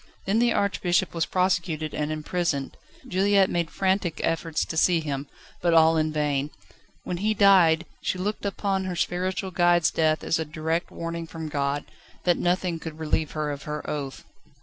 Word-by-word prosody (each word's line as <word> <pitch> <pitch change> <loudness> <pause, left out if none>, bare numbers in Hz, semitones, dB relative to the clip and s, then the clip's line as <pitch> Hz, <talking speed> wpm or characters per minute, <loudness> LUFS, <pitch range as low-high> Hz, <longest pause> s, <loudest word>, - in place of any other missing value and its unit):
Then 205 +4 +2
the 240 0 +3
Archbishop 185 -3 +1
was 165 -1 0
prosecuted 175 -4 0
and 150 0 -2
imprisoned. 155 -2 -2 0.3
Juliette 195 +1 +3
made 170 -1 0
frantic 190 -3 0
efforts 165 -1 0
to - - -6
see 170 +1 +4
him, 145 -3 -4 0.3
but 170 -1 +3
all 160 0 +6
in 155 -1 +1
vain. 145 -2 0 0.5
When 180 - -3
he 215 +4 0
died, 180 -5 +5 0.2
she - - -1
looked 205 +4 -3
upon 195 -1 -1
her 185 -1 -3
spiritual 185 +2 -1
guide's 175 -2 +3
death 155 -1 +1
as 165 - +1
a - - 0
direct 160 +2 -2
warning 165 0 -5
from 160 -1 -6
God, 140 0 -1 0.4
that 175 -1 +2
nothing 175 -1 0
could 160 -1 -7
relieve 155 -1 -1
her 150 -1 -2
of 140 0 -7
her 150 0 -4
oath. 140 -3 -5
165 Hz, 170 wpm, -25 LUFS, 155-185 Hz, 0.5 s, all